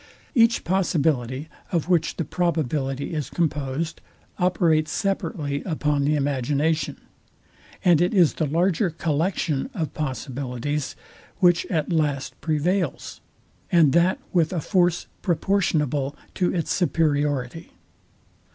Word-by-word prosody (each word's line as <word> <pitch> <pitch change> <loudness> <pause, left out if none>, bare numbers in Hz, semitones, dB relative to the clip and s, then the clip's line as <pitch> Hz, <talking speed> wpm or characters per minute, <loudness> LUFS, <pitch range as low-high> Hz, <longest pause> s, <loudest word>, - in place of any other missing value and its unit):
Each 230 -3 +4
possibility, 150 -7 0 0.2
of 170 -4 0
which 170 -3 +2
the 165 - -2
probability 145 -4 -1
is 150 -3 -3
composed, 155 -1 -2 0.4
operates 165 -4 +2
separately 160 -7 -2
upon 150 -4 0
the 150 +1 +2
imagination; 145 +2 0 0.9
and 175 -3 +5
it 175 - +2
is 180 -7 +4
the 155 - -1
larger 175 +4 +1
collection 160 - -1
of 160 -6 -3
possibilities, 135 0 -3 0.4
which 175 -2 +3
at 165 -2 -1
last 145 -4 0
prevails, 165 +2 -1 0.5
and 160 -6 +5
that 170 +3 +3 0.2
with 165 -4 +3
a 180 - -1
force 175 +1 +1 0.2
proportionable 150 -7 0 0.2
to 180 - +1
its 165 -3 -2
superiority. 150 -4 0
160 Hz, 110 wpm, -24 LUFS, 145-175 Hz, 0.9 s, and